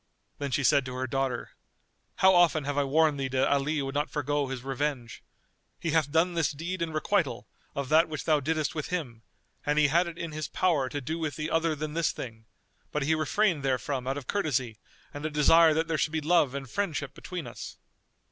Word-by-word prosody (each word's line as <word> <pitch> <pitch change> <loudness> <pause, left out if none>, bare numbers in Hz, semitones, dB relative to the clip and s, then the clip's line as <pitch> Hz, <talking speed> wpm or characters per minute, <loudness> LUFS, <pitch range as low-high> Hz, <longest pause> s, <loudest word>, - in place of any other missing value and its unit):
Then 140 -1 -2
she 140 +1 0
said 140 +1 +4
to 125 - -6
her 130 0 -2
daughter, 135 0 -2 0.6
"How 190 0 +5
often 175 -4 +4
have 145 +1 -2
I 145 - +2
warned 150 +1 +2
thee 135 - -1
that 130 0 +1
Ali 140 +1 +1
would 135 0 -4
not 145 +1 -1
forego 145 -1 -1
his 130 -2 -5
revenge? 135 -3 -3 0.6
He 165 - -2
hath 155 -2 +2
done 165 +3 +2
this 165 -3 +1
deed 170 +5 -5
in 165 -1 -1
requital 155 - 0 0.3
of 140 -2 -3
that 160 +1 +5
which 155 - -4
thou 155 -2 +3
diddest 155 +1 -1
with 155 -3 -4
him 135 -11 -4 0.4
and 150 +1 0
he 150 -1 +5
had 170 +4 +3
it 170 -1 -7
in 165 -1 -5
his 155 -1 -4
power 155 -8 +1
to 145 - -4
do 160 +6 -3
with 155 -4 -2
thee 155 +2 -4
other 165 -1 +1
than 150 0 -4
this 170 0 +1
thing; 110 -2 -8 0.5
but 150 - -1
he 155 +3 +2
refrained 170 +1 +1
therefrom 130 0 -1
out 135 +1 -1
of 140 - -6
courtesy 130 - -1 0.3
and 145 - -7
a 155 - -1
desire 160 +2 +6
that 160 +1 +1
there 165 -2 -1
should 155 - 0
be 160 - +1
love 155 -3 +2
and 135 -1 -5
friendship 160 -9 -2
between 180 -3 -6
us." - - -8
150 Hz, 220 wpm, -28 LUFS, 135-160 Hz, 0.6 s, desire